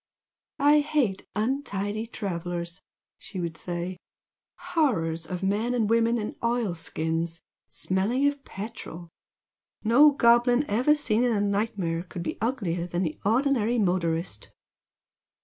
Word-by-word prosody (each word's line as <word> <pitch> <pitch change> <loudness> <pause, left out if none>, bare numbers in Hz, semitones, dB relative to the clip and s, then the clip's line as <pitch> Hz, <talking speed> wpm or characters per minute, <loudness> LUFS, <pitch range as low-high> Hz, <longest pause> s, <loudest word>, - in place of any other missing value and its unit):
"I 290 +2 +5
hate 285 -10 0
untidy 215 -3 -2
travellers!" 175 -4 -4 0.4
she 190 - -7
would 170 -2 -3
say 175 +2 -4 0.8
"Horrors 165 - +1
of 180 0 -5
men 215 +6 0
and 225 -3 +1
women 230 +1 +3
in 210 -2 -4
oil 235 -5 +1
skins, 165 0 -2 0.3
smelling 190 - 0
of 285 -1 0
petrol! 195 -6 -8 0.7
No 245 +7 +7
goblin 245 0 +4
ever 250 +9 +3
seen 240 -6 +1
in 245 - +2
a 215 - +1
nightmare 200 -5 -1
could 175 -1 -7
be - - -4
uglier 195 -8 -1
than 175 +1 -1
the 155 -3 -3
ordinary 240 +1 +2
motorist!" 170 - -1
205 Hz, 125 wpm, -27 LUFS, 175-240 Hz, 0.8 s, No